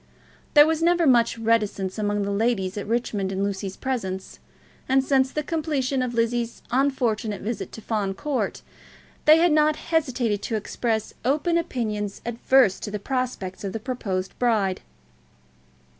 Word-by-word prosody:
There 295 0 +9
was 320 0 0
never 345 0 +3
much 235 -4 +4
reticence 215 -3 0
among 205 -1 0
the 200 - -2
ladies 200 -3 0
at 205 0 -5
Richmond 215 -4 -1
in 195 +1 -1
Lucy's 195 -1 -3
presence, 190 -8 -4 0.5
and 265 0 +4
since 265 -1 +2
the 300 - -2
completion 285 -4 -1
of 245 -1 -2
Lizzie's 235 0 -1
unfortunate 240 -6 0
visit 230 +3 -4
to 225 - -8
Fawn 205 -3 -2
Court, 290 +3 -2 0.6
they 310 +1 +8
had 340 0 +4
not 305 0 +4
hesitated 255 -12 0
to 225 - -2
express 220 +1 -2
open 300 +7 +1
opinions 215 -10 -2
adverse 235 -2 +3
to - - -5
the 210 - -3
prospects 235 -5 -3
of 195 -2 -4
the 225 - -3
proposed 200 -6 -3
bride. 210 -6 +1
235 Hz, 150 wpm, -24 LUFS, 205-265 Hz, 0.6 s, There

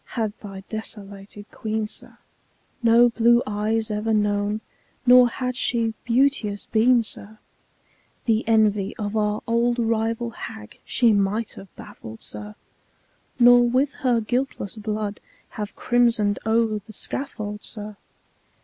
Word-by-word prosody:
had 220 -3 0
thy 195 -2 -9
desolated 205 -2 -8
Queen, 220 0 -3
sir, 210 - -10 0.6
No 235 +1 +6
blue 235 +1 +4
eyes 215 +2 -1
ever 215 +1 0
known, 210 0 0 0.4
nor 250 0 +7
had 250 +1 -3
she 230 -3 0
beauteous 235 -4 +1
been, 235 +2 +3
sir, 215 0 -7 0.9
The 225 -1 +2
envy 210 -3 +2
of 205 0 -4
our 210 -1 0
old 235 +1 +1
rival 230 0 0
hag 105 - -9
she 235 -3 +3
might 205 +3 0
have 195 - -10
baffled, 110 0 -11
sir, 105 0 -7 0.8
Nor 245 0 +6
with 265 +4 +2
her 245 -3 +2
guiltless 240 -2 -2
blood 210 -1 -4 0.3
have 210 -1 -6
crimson'd 235 -4 +2
o'er 220 -1 +2
the 215 +2 -15
scaffold, 210 -3 -5
sir. 210 -1 -6
220 Hz, 125 wpm, -23 LUFS, 210-235 Hz, 0.9 s, nor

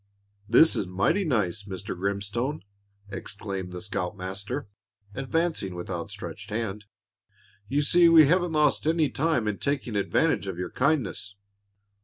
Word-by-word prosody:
"This 160 +8 +6
is 95 - -1
mighty 95 - +1
nice, 105 - 0
Mr. 100 0 -5
Grimstone!" 100 +9 -2 0.5
exclaimed 95 -1 -5
the 90 -1 -6
scoutmaster, 100 +6 -4 0.5
advancing 135 - -1
with 90 +2 -6
outstretched 85 -2 -6
hand. 105 -1 -3 0.8
"You 145 +6 +1
see 170 +3 +5
we 160 -2 +8
haven't 175 +2 +2
lost 150 -1 +2
any 160 -4 +2
time 155 -7 +1
in 105 -2 -2
taking 140 -5 -2
advantage 100 0 +1
of 95 -3 -4
your 90 - -4
kindness." 125 -8 0
105 Hz, 130 wpm, -27 LUFS, 95-150 Hz, 0.8 s, we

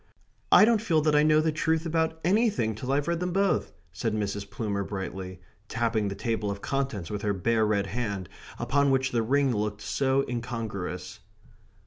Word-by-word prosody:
"I - - +9
don't 225 -2 +3
feel 165 -8 +2
that 150 0 +2
I 150 - +6
know 155 0 +4
the 160 0 +1
truth 160 +1 0
about 160 0 0
anything 190 - +2
till 125 +5 -4
I've 145 +1 +1
read 170 -1 0
them 180 0 -2
both!" 195 +1 +1 0.2
said 110 +3 -2
Mrs. 100 -1 -3
Plumer 100 -1 -2
brightly, 95 -2 -6 0.3
tapping 115 -3 0
the 100 - -3
table 110 0 -2
of 100 0 -4
contents 135 -9 -3
with 105 -1 -3
her 105 -1 0
bare 110 +3 +1
red 100 -2 +1
hand, 100 -3 -3 0.3
upon 140 +2 +2
which 130 0 +1
the 120 - +1
ring 135 +2 +2
looked 105 0 -2
so 135 0 +1
incongruous. 110 -7 -5
115 Hz, 180 wpm, -27 LUFS, 100-150 Hz, 0.3 s, I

